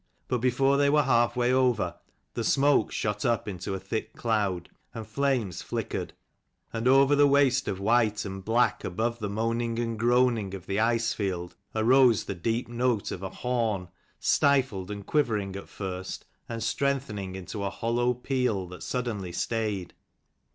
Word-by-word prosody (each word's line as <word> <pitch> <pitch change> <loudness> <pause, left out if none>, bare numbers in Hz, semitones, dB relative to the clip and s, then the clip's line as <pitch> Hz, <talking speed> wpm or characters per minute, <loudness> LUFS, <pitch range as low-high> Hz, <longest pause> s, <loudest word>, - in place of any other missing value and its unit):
But 125 - 0
before 135 +3 +2
they 140 0 +4
were 150 +1 +4
half 120 -2 +3
way 125 0 +2
over, 125 -9 +2 0.4
the 115 - -2
smoke 140 -1 +3
shot 105 -1 -2
up 120 -2 +1
into 95 -1 -4
a - - -4
thick 95 +4 -4
cloud, 100 -6 -1 0.3
and 110 -1 -5
flames 115 -4 -1
flickered; - - -4 0.6
and 115 +1 -1
over 135 +2 +6
the 145 0 +6
waste 135 -2 +3
of 95 - -2
white 110 0 +2
and 95 -1 -6
black, 110 -1 +2
above 115 +6 -2
the 105 -2 -3
moaning 115 +2 -1
and 115 -2 -2
groaning 120 -4 +2
of 95 - -9
the 100 +1 -1
ice 115 +1 +2
field, 90 -4 -3 0.2
arose 120 +1 +5
the - - -4
deep 115 +6 -2
note 120 -2 0
of 90 - -5
a 95 - -4
horn, 115 -8 -1 0.3
stifled 130 -10 +2
and 100 -1 -6
quivering 110 -10 0
at 100 - -8
first, 95 -1 -6 0.2
and 115 -2 -4
strengthening 110 -9 -1
into 95 +2 -6
a 100 - 0
hollow 120 +4 0
peal, 125 -6 -1
that 90 - -10
suddenly 115 -8 -3
stayed. 105 -3 -2
115 Hz, 165 wpm, -27 LUFS, 100-125 Hz, 0.6 s, over